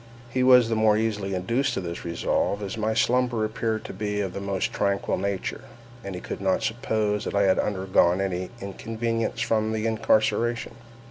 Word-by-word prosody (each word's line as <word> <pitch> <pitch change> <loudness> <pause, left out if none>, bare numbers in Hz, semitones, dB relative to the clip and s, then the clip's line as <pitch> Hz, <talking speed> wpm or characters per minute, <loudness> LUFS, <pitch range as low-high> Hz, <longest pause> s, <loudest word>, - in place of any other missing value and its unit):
He 130 - 0
was 125 -2 +7
the 115 - 0
more 110 -1 +4
easily 105 -3 -1
induced 115 +10 0
to - - -1
this 85 -2 -5
resolve, 85 +4 -1
as 100 +1 -4
my 110 0 -1
slumber 120 -1 +2
appeared 110 0 -2
to - - -6
be 105 +1 -2
of 95 -3 -2
the 100 - -5
most 100 -1 -2
tranquil 100 -1 0
nature, 100 0 -3 0.4
and 100 -1 -5
he 90 - -6
could - - -6
not 95 -1 +1
suppose 110 -3 0
that - - -3
I 100 - +4
had 95 -1 +3
undergone 95 -2 +2
any 95 -1 -2
inconvenience 115 +3 -3
from 110 -1 +1
my 110 - -1
incarceration. 115 +1 +1
105 Hz, 185 wpm, -25 LUFS, 95-115 Hz, 0.4 s, was